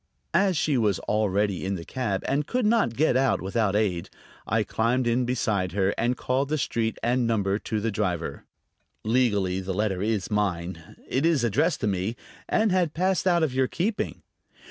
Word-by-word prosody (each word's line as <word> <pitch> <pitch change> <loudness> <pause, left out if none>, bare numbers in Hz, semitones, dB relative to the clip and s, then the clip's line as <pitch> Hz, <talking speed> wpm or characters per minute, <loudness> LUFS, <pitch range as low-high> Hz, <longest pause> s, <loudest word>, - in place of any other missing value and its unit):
As 190 0 +3
she 150 -3 +1
was 105 -4 +2
already 105 -2 0
in 95 +1 -1
the 85 -2 -7
cab 105 -7 -2
and 140 +2 0
could 250 -2 0
not 215 - +2
get 150 -1 +2
out 135 +1 +2
without 100 +1 0
aid, 95 -5 0 0.4
I 110 +1 +2
climbed 115 +5 0
in 120 +1 +1
beside 105 -7 -1
her 95 0 +1
and 120 +2 0
called 135 +2 0
the 155 - +1
street 115 -5 -1
and 120 0 +2
number 100 -3 +1
to 110 - -3
the 115 +2 -1
driver. 90 -5 -2 0.6
"Legally 105 -6 +1
the 95 0 -4
letter 100 -3 0
is 105 -2 -1
mine; 90 -5 -2
it 130 - 0
is 160 -6 +3
addressed 140 - +1
to - - +1
me, 100 +3 -1 0.3
and 215 -2 +2
had 180 -4 +1
passed 185 +2 +1
out 175 -2 +3
of 145 -5 0
your 130 0 +2
keeping." 205 - -2
115 Hz, 185 wpm, -26 LUFS, 100-135 Hz, 0.6 s, As